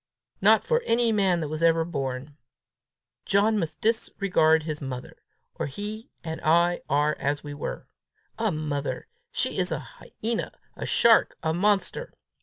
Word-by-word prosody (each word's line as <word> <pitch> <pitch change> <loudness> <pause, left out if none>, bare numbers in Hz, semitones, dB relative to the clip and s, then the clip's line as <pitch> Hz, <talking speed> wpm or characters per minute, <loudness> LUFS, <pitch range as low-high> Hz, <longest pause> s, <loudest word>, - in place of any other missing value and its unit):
Not - - +6
for 475 +1 +1
any 230 0 +3
man 190 -5 +2
that 155 +1 -3
ever 165 -1 +4
was 170 - -9
born! 135 0 -4 0.9
John 210 +2 +3
must 160 -4 -4
discard 195 -8 +2
his 155 -1 -4
mother, 130 -2 -6 0.4
or - - -3
he 210 - -6
and 160 -1 -5
I 170 +2 +3
are 150 +2 +2
as 145 +1 -1
we 145 -1 -6
were! 145 - -5 0.5
A 220 -2 +1
mother! 150 -3 -3 0.3
She - - -2
is - - 0
a - - 0
hyena, 230 +1 -5 0.2
a - - -5
shark, 230 -1 +4
a 160 0 +1
monster! 205 - 0
165 Hz, 150 wpm, -26 LUFS, 150-210 Hz, 0.9 s, Not